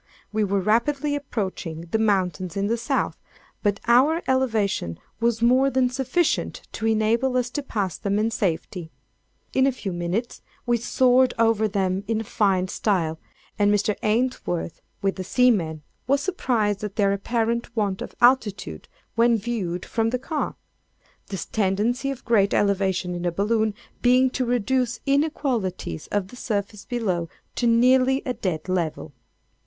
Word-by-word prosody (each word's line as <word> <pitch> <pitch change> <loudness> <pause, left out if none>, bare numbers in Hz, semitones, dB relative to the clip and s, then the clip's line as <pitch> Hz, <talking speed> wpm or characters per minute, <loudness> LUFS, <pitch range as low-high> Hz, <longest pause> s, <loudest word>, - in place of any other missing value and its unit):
We 215 0 +1
were 200 -1 +1
rapidly 275 +8 +1
approaching 190 - -4
the 220 - +1
mountains 185 -4 0
in 200 - 0
the 225 +3 +1
South; 240 +4 -1 0.5
but 205 -1 +1
our 280 +8 +4
elevation 220 - 0 0.2
was 230 0 +1
more 255 +3 +5
than 255 -1 +1
sufficient 270 +6 -1
to 225 - -2
enable 225 +4 +2
us 245 -1 -1
to 290 - -2
pass 205 - -3
them 200 0 0
in 220 +2 +1
safety. 175 -3 -2 0.6
In 265 0 +4
a - - +3
few 210 -7 -5
minutes 175 +7 -3 0.2
we 240 -1 +2
soared 255 +2 +3
over 225 -1 +3
them 190 -1 -1
in 225 0 0
fine 195 -3 +1
style; 170 -6 0 0.4
and 205 0 +4
Mr. 205 0 +1
Ainsworth, 215 -7 -1 0.2
with 195 0 0
the 185 - -3
seamen, 185 -9 +2 0.2
was 280 +2 +3
surprised 235 - 0
at 210 -2 -4
their 200 -2 +2
apparent 230 +3 -1
want 200 -4 -1
of - - -7
altitude 210 - +2 0.3
when 230 0 +4
viewed 195 -6 -3
from 225 -1 0
the 250 - 0
car, 295 +4 -3 0.7
the 195 - -5
tendency 220 +6 0
of 270 -3 -6
great 200 -4 +3
elevation 190 -3 +1
in 175 0 -4
a 175 - +1
balloon 215 +3 +1 0.3
being 255 +1 +4
to 255 - -1
reduce 245 +1 0
inequalities 265 - -1
of 200 -2 -2
the - - -12
surface 205 -3 -3
below, 190 -9 -2 0.2
to 240 - 0
nearly 255 +3 +4
a 250 - -1
dead 180 -7 -3
level. 170 -4 -2
220 Hz, 150 wpm, -24 LUFS, 195-250 Hz, 0.7 s, more